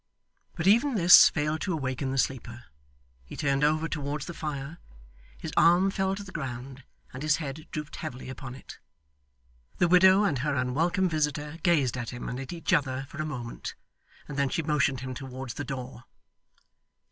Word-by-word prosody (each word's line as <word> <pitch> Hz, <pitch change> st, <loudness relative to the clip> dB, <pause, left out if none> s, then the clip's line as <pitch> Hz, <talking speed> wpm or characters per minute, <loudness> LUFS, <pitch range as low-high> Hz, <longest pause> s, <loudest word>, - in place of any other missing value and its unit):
But 160 Hz, -, -3 dB
even 235 Hz, +7 st, +4 dB
this 175 Hz, -3 st, +9 dB
failed 150 Hz, 0 st, -1 dB
to 185 Hz, -, -1 dB
awaken 135 Hz, -3 st, -2 dB
the 135 Hz, -, -2 dB
sleeper. 120 Hz, -3 st, -2 dB, 0.6 s
He 60 Hz, -, -11 dB
turned 140 Hz, -1 st, +1 dB
over 155 Hz, +2 st, +2 dB
towards 150 Hz, -2 st, -3 dB
the 175 Hz, -, -6 dB
fire, 150 Hz, 0 st, -5 dB, 0.6 s
his 160 Hz, -, -7 dB
arm 175 Hz, +3 st, +5 dB
fell 190 Hz, 0 st, 0 dB
to 205 Hz, -, -7 dB
the 190 Hz, -, -11 dB
ground, 135 Hz, -3 st, -6 dB, 0.3 s
and 130 Hz, -, -7 dB
his 155 Hz, 0 st, +3 dB
head 150 Hz, -1 st, -6 dB
drooped 150 Hz, -1 st, -6 dB
heavily 125 Hz, +1 st, -6 dB
upon 130 Hz, -1 st, -7 dB
it. 135 Hz, -, -12 dB, 1.0 s
The 175 Hz, -, +3 dB
widow 185 Hz, +3 st, +6 dB
and 155 Hz, -10 st, +1 dB
her 145 Hz, +2 st, -1 dB
unwelcome 160 Hz, +9 st, +1 dB
visitor 150 Hz, -1 st, -2 dB
gazed 145 Hz, -9 st, +2 dB
at 120 Hz, -, -4 dB
him 125 Hz, -1 st, -7 dB
and 125 Hz, -, -4 dB
at 135 Hz, -, -6 dB
each 170 Hz, +2 st, -2 dB
other 135 Hz, -4 st, +1 dB
for 155 Hz, -, -5 dB
a -, -, -2 dB
moment, 120 Hz, -6 st, -6 dB, 0.5 s
and 145 Hz, -1 st, -5 dB
then 140 Hz, -1 st, +2 dB
she 165 Hz, -, -1 dB
motioned 145 Hz, -4 st, +1 dB
him 130 Hz, 0 st, -5 dB
towards 130 Hz, -1 st, -7 dB
the 145 Hz, -, -5 dB
door. 130 Hz, -3 st, -7 dB
150 Hz, 180 wpm, -28 LUFS, 130-165 Hz, 1.0 s, this